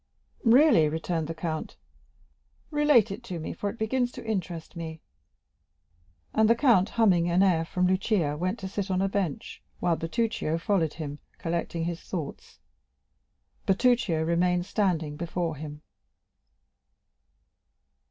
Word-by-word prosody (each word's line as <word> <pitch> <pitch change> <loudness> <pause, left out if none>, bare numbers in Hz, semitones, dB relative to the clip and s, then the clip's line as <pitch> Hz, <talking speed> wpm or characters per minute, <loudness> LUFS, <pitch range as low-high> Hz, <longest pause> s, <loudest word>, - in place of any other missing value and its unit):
"Really," 235 - +6
returned 160 0 -2
the 165 - -5
count, 160 -1 -4 0.9
"relate 295 -9 +4
it 195 - -6
to 180 -6 -5
me, 160 - -5
for 205 +4 -3
it 230 - -8
begins 245 +3 0
to - - -9
interest 185 -6 -4
me." 160 -1 -6 1.3
And 220 0 +4
the 230 - +6
count, 230 -7 +4
humming 185 -7 +3
an 180 +3 +4
air 175 -4 +3
from 180 +2 0
Lucia, 185 -4 +1
went 185 +7 -2
to 190 - -4
sit 200 0 -3
down 190 -1 0
on - - +3
a - - 0
bench, 190 -7 -3 0.2
while 170 - +2
Bertuccio 165 -2 -1
followed 165 -3 0
him, 150 -2 -6 0.2
collecting 170 0 -2
his 170 +1 -3
thoughts. 165 -7 -6 1.1
Bertuccio 195 -5 +2
remained 175 +2 +1
standing 165 -8 0
before 170 -1 -2
him. 150 0 -8
180 Hz, 135 wpm, -27 LUFS, 165-210 Hz, 1.3 s, Really